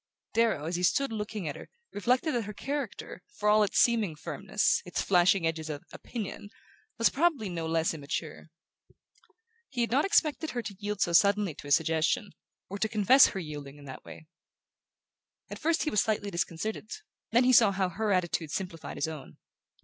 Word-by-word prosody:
Darrow, 225 -10 +2
as 170 +2 -2
he - - -3
stood 275 +9 +2
looking 210 -4 -4
at 145 - -4
her, - - -11 0.2
reflected 250 - +1
that 235 -3 -1
her 210 0 -8
character, 285 +1 -5 0.2
for 210 - -1
all 210 +1 +5
its 205 - 0
seeming 220 -9 +3
firmness, 200 +7 0
its 180 - -4
flashing 180 -1 +3
edges 160 -1 -2
of 145 -1 -5
"opinion", 210 -3 -7 0.5
was 230 - +3
probably 285 - +1
no 165 -2 -4
less 165 0 +1
immature. 155 +1 -5 1.2
He 245 - -3
had 235 - 0
not 275 +4 +3
expected 315 -6 +1
her 240 -5 -3
to 205 -2 -7
yield 205 -1 -4
so 170 - +1
suddenly 200 -1 +4
to 145 - -11
his 145 - +6
suggestion, 165 +7 0 0.4
or 200 +1 -6
to 220 - 0
confess 220 +6 +6
her 195 - -4
yielding 145 -4 -8
in 145 - -13
that 130 - -9
way. 160 - -12 1.3
At - - -6
first 325 +1 +1
he 305 - -1
was 210 - +3
slightly 210 -3 -1
disconcerted; 175 +5 -3 0.4
then 240 +3 +4
he 255 +1 +4
saw 225 -4 +7
how 190 -1 0
her 210 +4 -2
attitude 175 -4 0
simplified 170 -1 -5
his - - 0
own. 155 -4 -9
200 Hz, 185 wpm, -29 LUFS, 165-230 Hz, 1.3 s, saw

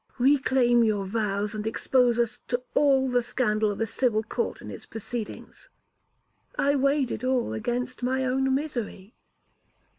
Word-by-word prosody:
'Reclaim 255 -2 +4
your 210 -3 +1
vows, 205 0 -1
and 215 0 -4
expose 245 +1 +2
us 240 0 -1
to 245 0 -1
all 270 -2 +4
the 250 -1 +2
scandal 215 -3 0
of 205 - -4
a 225 - +1
civil 225 -1 0
court 455 - -3
and - - -9
its - - -9
proceedings.' 225 0 -7 0.9
'I 285 +1 +2
weighed 275 -1 +2
it - - -4
all 255 - 0
against 245 - -3
my 260 +1 0
own 265 +1 +1
misery.' 235 -8 -4
245 Hz, 150 wpm, -26 LUFS, 220-265 Hz, 0.9 s, Reclaim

